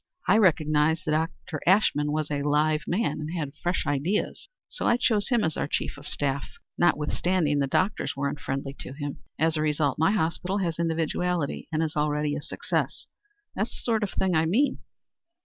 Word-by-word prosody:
I 205 +4 +5
recognized 155 -4 +3
that 155 +1 +1 0.2
Dr. 155 -4 -5
Ashmun 175 -6 +4
was 155 0 -1
a 145 -1 0
live 150 +1 +2
man 200 +2 0
and 150 0 -4
had 145 -4 -3
fresh 175 +1 0
ideas, 145 +9 -1 0.2
so - - -2
I 240 - +4
chose 215 -4 +1
him 240 -4 +3
as 160 -2 0
our - - -1
chief - - -2
of 145 +1 -11
staff, 140 -1 -2 0.3
notwithstanding 160 -1 +1
the 140 - +1
doctors 185 -1 0
were 140 +1 -1
unfriendly 135 -1 -4
to 130 - -6
him. 145 0 -5 0.2
As 160 +1 +2
a - - 0
result, 150 -1 +1
my 160 - +4
hospital 185 0 0
has 170 -5 -1
individuality, 165 0 -1
and 160 0 +1
is 160 -1 -3
already 150 0 0
a 150 - -4
success. - - -2 0.5
That's - - -2
the - - -7
sort 225 -2 +1
of 210 - 0
thing 190 -1 0
I 160 0 +3
mean. 255 - +2
155 Hz, 185 wpm, -27 LUFS, 145-180 Hz, 0.5 s, I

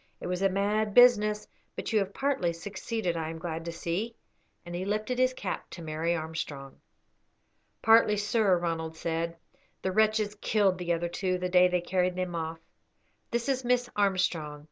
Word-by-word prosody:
It - - -8
was 180 +1 -2
a 195 - +4
mad 205 +2 0
business, 210 -4 +5 0.3
but - - -4
you 215 - +5
have 195 -1 -2
partly 265 -10 0
succeeded, 195 +1 -3
I 160 -1 -2
am 165 - -6
glad 165 0 -4
to 170 - -3
see," 175 +7 -3 0.5
and 175 - -8
he 175 +1 -3
lifted 215 +5 -1
his 255 0 +4
cap 205 -7 -5
to 170 - -9
Mary 160 +2 -1
Armstrong. 155 -4 -6 1.0
"Partly, 225 -1 +6
sir," 205 -2 +2
Ronald 160 -2 -3
said. 165 +1 -2 0.5
"The 190 - 0
wretches 215 +1 +2
killed 205 -3 +1
the 175 -1 -2
other 170 0 0
two 185 +1 -1
the 180 0 -2
day 180 0 +6
they 180 -1 0
carried 180 0 0
them 185 -1 -2
off. 165 -1 -3 0.7
This 235 +1 -1
is 265 -1 0
Miss 245 0 +1
Armstrong. 180 -7 0
185 Hz, 175 wpm, -29 LUFS, 170-215 Hz, 1.0 s, Partly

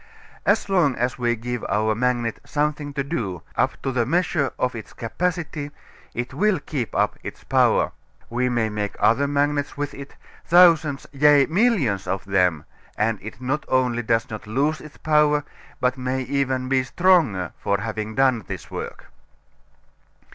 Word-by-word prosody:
As - - +3
long 175 -9 +2
as 125 +2 -2
we 120 -1 +1
give 120 +1 -4
our 110 +1 +2
magnet 120 0 -1
something 150 0 -1
to 140 - 0
do, 110 - -4
up - - 0
to 135 - -1
the 125 -2 +1
measure 160 0 +1
of 125 0 0
its 115 -2 -9
capacity, 160 +3 -3 0.5
it 120 +1 -4
will 210 -3 +2
keep 140 -5 -4
up - - +1
its - - -8
power. - - +3 0.4
We 125 +2 0
may 120 -2 +1
make 105 -1 -3
other 140 +5 +3
magnets 145 0 0
with 145 0 -3
it, 140 0 -10 0.3
thousands, 165 -5 +5
yea, 145 0 +5
millions 160 - +1
of 95 - -2
them, 90 -6 +1 0.3
and 110 -1 +1
it 110 +3 -9
not 135 +4 -2
only 125 -2 +1
does 115 0 +1
not 110 -1 -8
lose 145 +8 0
its 150 - -12
power 150 -1 +3 0.4
but 125 +1 0
may 130 +1 -1
be 135 +3 -5
even 130 -1 +1
stronger 135 - +2
for 100 -1 0
having 110 0 -4
done 130 -4 +3
this 85 -7 -7
work. - - -6
130 Hz, 160 wpm, -23 LUFS, 115-150 Hz, 0.5 s, thousands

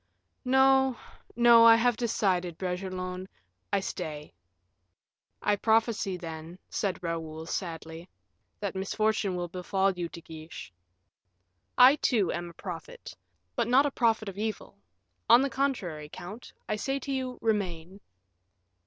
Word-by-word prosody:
"No, 265 -1 +4 0.4
no; 235 -1 +7
I 230 0 +9
have 240 +1 +3
decided, 190 -7 0
Bragelonne; 185 0 -4 0.4
I 200 -1 +2
stay." 155 -6 -6 1.1
"I 205 - +3
prophesy, 220 -3 +1
then," 165 0 -8
said 190 -3 -2
Raoul, 160 -1 -4
sadly, 165 0 -5 0.5
"that 200 -2 -3
misfortune 200 0 0
will 175 0 -3
befall 190 +2 0
you, 175 -2 -4
De 170 - -9
Guiche." 160 - -10 1.0
"I, 260 +4 +8
too, 225 -9 +1
am 175 0 -4
a - - -13
prophet, 170 -3 -8 0.4
but - - 0
not 260 +4 +5
a 290 - 0
prophet 225 -4 +1
of 195 0 -6
evil; 215 - -4 0.5
on 245 - +8
the 275 - -1
contrary, 180 - -2
count, 205 +9 -9 0.2
I 210 - -1
say 270 +6 -1
to 275 +1 -5
you, 260 -2 -3
'remain. 190 -4 -2
195 Hz, 130 wpm, -29 LUFS, 175-230 Hz, 1.1 s, I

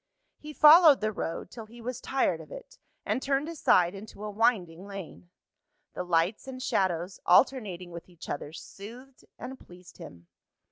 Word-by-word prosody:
He 305 - -9
followed 305 0 +8
the 215 0 -1
road 170 -3 -5
till 225 -2 -9
he 235 +2 -14
was 245 +1 -6
tired 270 0 0
of - - -15
it, - - -11 0.3
and 260 - -1
turned 275 +2 0
aside 185 - +2
into 205 +1 -10
a 210 - -4
winding 200 -5 0
lane. 180 - -9 0.6
The - - -4
lights 180 +7 0
and 260 -1 -7
shadows, 185 -6 -1
alternating 185 -4 +2
with 170 +1 -10
each 175 -2 -12
other, 145 +1 -5
soothed 240 +10 -12
and 265 +1 -8
pleased 180 +1 -16
him. 85 - -12
210 Hz, 160 wpm, -28 LUFS, 175-265 Hz, 0.6 s, followed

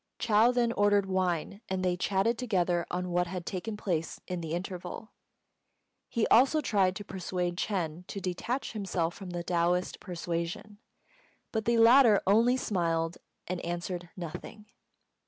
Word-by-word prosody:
Chou 225 +1 +4
then 240 -1 +2
ordered 205 -2 +3
wine, 185 +1 -1
and 185 -1 -1
they 180 -1 +2
chatted 195 +5 +1
together 180 -8 0
on 180 0 -3
what 175 0 +1
had 180 -1 -5
taken 210 +3 -4
place 165 -6 -2
in 180 -1 -3
the 160 -1 -4
interval. 180 +4 -5 1.0
He 230 -3 +1
also 270 +6 +5
tried 195 -9 +2
to 205 - -6
persuade 180 -1 -3
Ch'êng 175 -3 -2
to 200 - -5
detach 195 +8 -3
himself 190 -5 -1
from 195 -1 -9
the 175 -1 -4
Taoist 175 +1 0
persuasion, 175 +3 -4 0.7
but 220 -1 -2
the 235 0 +3
latter 230 -2 +7
only 230 +6 +4
smiled 165 -6 -1 0.3
and 180 0 -3
answered 175 0 -4
nothing. 180 +5 -7
185 Hz, 145 wpm, -30 LUFS, 175-215 Hz, 1.0 s, latter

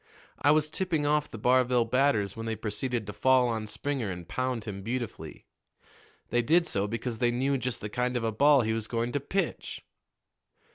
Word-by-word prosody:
I - - +4
was 150 0 +3
tipping 165 -4 0
off 150 0 +1
the - - -8
Barville 125 +1 +3
batters 115 -5 +1
when 115 0 -5
they 110 - -1
proceeded 115 +2 -3
to 105 - -6
fall 130 +4 +4
on 110 -2 -2
Springer 130 0 -3
and 90 -2 -6
pound 130 -1 -2
him 100 -3 -6
beautifully. 120 +2 -5 0.9
They 120 - +3
did 165 +8 +3
so 100 -7 -1
because 115 +1 -4
they 120 - +3
knew 130 +3 +1
just 125 0 -3
the 105 - -3
kind 125 +3 -1
of 120 - -3
a 115 - 0
ball 140 +5 +5
he 110 -1 0
was 110 -1 -3
going 120 0 -1
to 145 - 0
pitch." 175 +5 -3
120 Hz, 195 wpm, -28 LUFS, 110-135 Hz, 0.9 s, ball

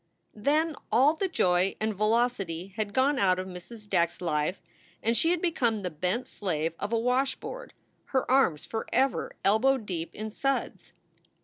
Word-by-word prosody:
Then 300 +8 +1 0.2
all 260 +7 +5
the 380 +4 -1
joy 180 - +2
and 220 0 0
velocity 210 -5 0
had 215 -2 -2
gone 265 +5 +2
out 185 -2 +3
of 185 - -3
Mrs. 190 +4 -9
Back 170 -4 +2
s - - -16
life 155 0 -1 0.4
and 230 +1 +2
she 325 +9 +3
had 350 0 0
become 235 - +1
the 180 - -2
bent 185 +10 -1
slave 165 -5 -2
of 205 - -3
a 230 - +2
washboard, 265 - -1 0.3
her 260 -1 -1
arms 255 - +3
forever 250 +4 0
elbow 245 +7 +4
deep 180 -8 -5
in 215 +1 -5
suds. 275 +5 -2
220 Hz, 165 wpm, -28 LUFS, 185-265 Hz, 0.4 s, all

